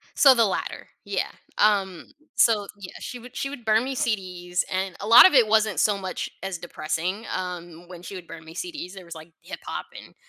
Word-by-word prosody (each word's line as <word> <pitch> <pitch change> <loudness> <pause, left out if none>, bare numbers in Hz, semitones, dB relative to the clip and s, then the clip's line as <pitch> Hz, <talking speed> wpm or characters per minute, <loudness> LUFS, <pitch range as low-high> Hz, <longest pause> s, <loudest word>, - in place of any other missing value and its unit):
So 270 -2 +8
the 230 - +4
latter, 200 - -3 0.2
yeah. - - -1 0.3
Um, 195 -4 +2 0.3
so 210 -3 +4
yeah, 185 - -8
she 250 - -6
would 245 +1 -13
she 275 - -2
would 260 -5 -9
burn 220 +2 +3
me 270 - -3
CDs, 180 -7 -1
and 190 0 -2
a 205 - -5
lot 235 +8 +10
of 370 - +4
it 245 -4 +7
wasn't 215 -1 +2
so 205 -2 +3
much 185 -1 -4
as 190 -2 -4
depressing, 175 +5 -3
um, 175 -2 -6
when 175 -1 -10
she 195 - -8
would 180 -3 -8
burn 160 - -10
me 160 +1 -12
CDs, 300 - -6
there 190 -2 -10
was 170 - -9
like 160 +1 -12
hip - - -8
hop - - -4
and - - -12
195 Hz, 215 wpm, -25 LUFS, 175-225 Hz, 0.3 s, lot